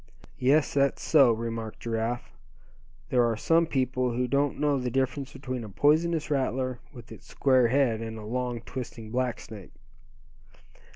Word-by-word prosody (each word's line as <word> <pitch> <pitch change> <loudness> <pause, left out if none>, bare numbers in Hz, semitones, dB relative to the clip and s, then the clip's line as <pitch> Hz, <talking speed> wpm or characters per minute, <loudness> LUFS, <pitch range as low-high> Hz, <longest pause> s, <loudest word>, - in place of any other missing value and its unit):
"Yes, 145 +4 +3
that's 140 -1 +1
so," 140 -6 +5
remarked 115 -1 -4
Giraffe, 115 +1 -3 0.8
"there 125 -1 +3
are 115 -2 +1
some 165 +7 +3
people 130 -3 0
who 125 +1 0
don't 140 +2 0
know 145 -2 +2
the 125 -1 -2
difference 135 +2 -1
between 130 -4 -5
a 110 - -8
poisonous 155 - +2
rattler, 130 -2 -1
with 120 -4 -13
its - - -12
square 130 -3 +3
head, 120 -3 +1
and 110 0 -6
a 110 - -8
long 125 +1 -3
twisting 115 -2 -7
black 125 -2 -1
snake." 100 -6 -11
125 Hz, 155 wpm, -27 LUFS, 115-140 Hz, 0.8 s, so